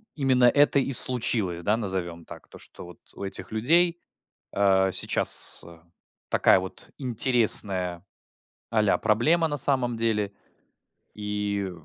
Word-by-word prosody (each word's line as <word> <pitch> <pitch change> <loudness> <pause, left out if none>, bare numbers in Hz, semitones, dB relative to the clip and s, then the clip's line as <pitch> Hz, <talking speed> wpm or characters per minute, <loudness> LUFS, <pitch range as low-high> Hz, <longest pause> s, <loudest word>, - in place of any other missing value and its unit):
именно 130 -4 +2
это 145 +3 +4
и 135 - -2
случилось, 110 -8 +4
да, 105 +4 +1
назовем 90 -6 -5
так. - - -13
То, - - -15
что - - -13
вот 90 -1 -14 0.2
у - - -10
этих 95 - -6
людей, 170 +10 +1 0.5
э, 95 -1 +2
сейчас - - 0 0.7
такая - - +3
вот 95 - -10
интересная 105 -8 -1 0.7
а-ля 110 -3 +1
проблема 150 +11 +1
на 145 -1 -4
самом 130 -3 +1
деле. 110 -3 -2 0.8
И 105 -2 -4
110 Hz, 120 wpm, -25 LUFS, 95-130 Hz, 0.8 s, это